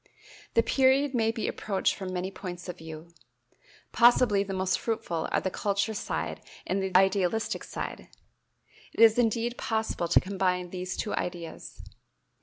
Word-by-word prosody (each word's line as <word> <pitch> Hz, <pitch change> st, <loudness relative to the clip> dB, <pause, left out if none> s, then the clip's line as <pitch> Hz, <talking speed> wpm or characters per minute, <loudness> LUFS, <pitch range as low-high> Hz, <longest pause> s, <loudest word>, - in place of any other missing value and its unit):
The 230 Hz, -, +5 dB
period 270 Hz, +2 st, +3 dB
may 225 Hz, -3 st, +2 dB
be 225 Hz, -1 st, -2 dB
approached 195 Hz, -3 st, 0 dB
from 190 Hz, -1 st, -6 dB
many 185 Hz, +1 st, -3 dB
points 180 Hz, -2 st, -7 dB
of 180 Hz, 0 st, -7 dB
view. 160 Hz, +1 st, -10 dB, 0.8 s
Possibly 235 Hz, -4 st, +5 dB
the 200 Hz, 0 st, -4 dB
most 185 Hz, -1 st, 0 dB
fruitful 175 Hz, -8 st, -2 dB
are -, -, +2 dB
the 190 Hz, -, -2 dB
culture 200 Hz, +3 st, -1 dB
side 205 Hz, -, -3 dB, 0.2 s
and 195 Hz, +1 st, -1 dB
the 190 Hz, -1 st, +3 dB
idealistic 190 Hz, +2 st, +1 dB
side. -, -, -6 dB, 0.9 s
It -, -, -10 dB
is 225 Hz, +1 st, +7 dB
indeed 235 Hz, +1 st, 0 dB
possible 220 Hz, -6 st, -1 dB
to 170 Hz, -, +5 dB
combine 185 Hz, -2 st, -1 dB
these 180 Hz, 0 st, -4 dB
two 210 Hz, -, -2 dB
ideas. 175 Hz, -2 st, -5 dB
195 Hz, 150 wpm, -28 LUFS, 180-225 Hz, 0.9 s, is